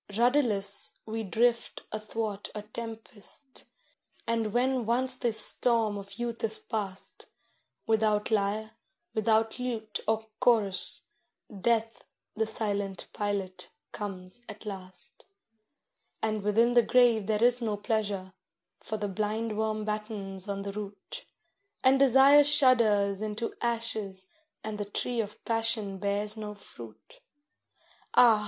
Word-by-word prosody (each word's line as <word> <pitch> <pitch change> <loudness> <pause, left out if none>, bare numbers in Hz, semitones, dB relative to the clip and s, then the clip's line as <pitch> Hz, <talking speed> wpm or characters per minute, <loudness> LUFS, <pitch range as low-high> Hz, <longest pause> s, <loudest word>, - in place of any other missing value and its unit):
Rudderless, 230 -6 +2
we 225 +1 -3
drift 230 +3 0
athwart 215 -1 -4
a 210 - -5
tempest, 225 +4 -8 0.6
and 230 -2 0
when 250 0 +1
once 255 +2 +3
the 250 -2 0
storm 220 0 +3
of 200 0 -8
youth 240 -1 -4
is 220 -1 0
past, 200 -4 -6 0.6
Without 215 -1 +2
lyre, 215 +1 0 0.4
without 220 +1 +1
lute 225 -4 -3
or 220 0 +1
chorus, 200 -6 +2 0.5
Death 225 +2 0 0.3
the 220 0 0
silent 205 -3 -2
pilot 200 -3 -3 0.2
comes 195 +2 -4
at 215 +1 -10
last. 185 -3 -9 1.0
And 215 -1 0
within 225 +4 +3
the 240 - +7
grave 235 -3 +4
there 215 0 +1
is 245 0 +4
no 215 -3 -1
pleasure, 205 -3 -2 0.5
for 220 - -4
the 205 0 -2
blindworm 215 +1 -2
battens 210 -2 -4
on 200 0 -3
the 200 0 -5
root, 200 -1 -8 0.6
And 265 +1 +5
Desire 275 +2 +7
shudders 220 -8 +5
into 215 +2 -3
ashes, 220 -5 -2 0.3
and 215 -1 -5
the 205 - -2
tree 235 +3 -1
of 210 -1 -9
Passion 225 -4 0
bears 205 +2 -1
no 210 -1 -6
fruit. 115 - -12 1.0
Ah! 230 -3 +7
215 Hz, 120 wpm, -29 LUFS, 205-230 Hz, 1.0 s, the